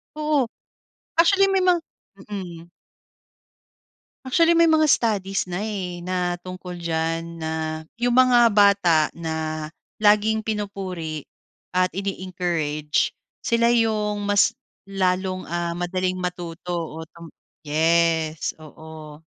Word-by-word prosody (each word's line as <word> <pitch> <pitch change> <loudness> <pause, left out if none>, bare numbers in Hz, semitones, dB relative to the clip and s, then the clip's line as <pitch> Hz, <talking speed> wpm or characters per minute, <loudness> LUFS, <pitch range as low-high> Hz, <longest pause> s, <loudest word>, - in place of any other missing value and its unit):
Oo. 300 -4 +1 0.7
Actually 390 +4 +5
may 385 -1 +2
mga 355 -2 +3 0.5
Mhm. 175 -4 -7 1.6
Actually, 335 +6 +4
may 335 -1 +5
mga 310 -1 +4
studies 200 -7 +1
na, 175 - -2
eh, 190 -5 -4
na 180 0 -2
tungkol 180 -1 -8
diyan, 165 0 -3
na 160 0 -3 0.2
yung 245 0 +1
mga 250 -2 +6
bata 195 -7 +4
na 160 -1 -4 0.3
laging 215 +1 +4
pinupuri 190 -8 -4 0.5
at 185 0 +2
ine-encourage, 175 -6 -1 0.3
sila 235 0 +2
yung 215 -3 +1
mas 205 +3 +3 0.3
lalong, 185 -1 -1
ah, 170 0 -3
madaling 185 +1 -1
matuto. 175 -1 -5
Oo, 160 -2 -4
tam 170 -1 -12 0.4
yes, 160 0 +1
oo. 155 0 -12
180 Hz, 105 wpm, -23 LUFS, 165-210 Hz, 1.6 s, mga